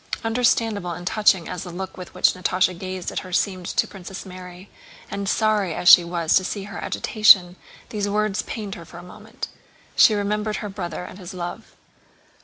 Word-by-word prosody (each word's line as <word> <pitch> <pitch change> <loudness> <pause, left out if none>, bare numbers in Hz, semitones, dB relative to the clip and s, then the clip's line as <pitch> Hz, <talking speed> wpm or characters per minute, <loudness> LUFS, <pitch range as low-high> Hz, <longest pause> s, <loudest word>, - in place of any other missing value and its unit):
Understandable 225 -5 +1
and 175 +1 -8
touching 190 -3 +3
as 180 - -5
the 185 - -7
look 185 +2 -6
with 180 -1 -10
which - - +4
Natásha 185 0 +1
gazed 185 0 -5
at - - -2
her 185 - -10
seemed 185 -1 -1
to - - 0
Princess 195 0 -9
Mary, 180 0 -10 0.4
and 200 -1 -3
sorry 210 -7 +1
as 180 - -3
she 180 - +10
was 170 -2 0
to 190 - +1
see 200 +1 -4
her 195 -2 -8
agitation, 190 -5 +4 0.3
these 205 -2 -2
words 210 -1 0
pained 210 -3 -6
her 170 - -9
for 170 - -13
a 175 - -10
moment. 215 +6 -9 0.5
She 215 - +6
remembered 210 +1 -1
her 210 - -5
brother 180 -4 -5
and 185 - -10
his 180 0 -9
love. 175 -1 -7
190 Hz, 190 wpm, -23 LUFS, 180-210 Hz, 0.5 s, she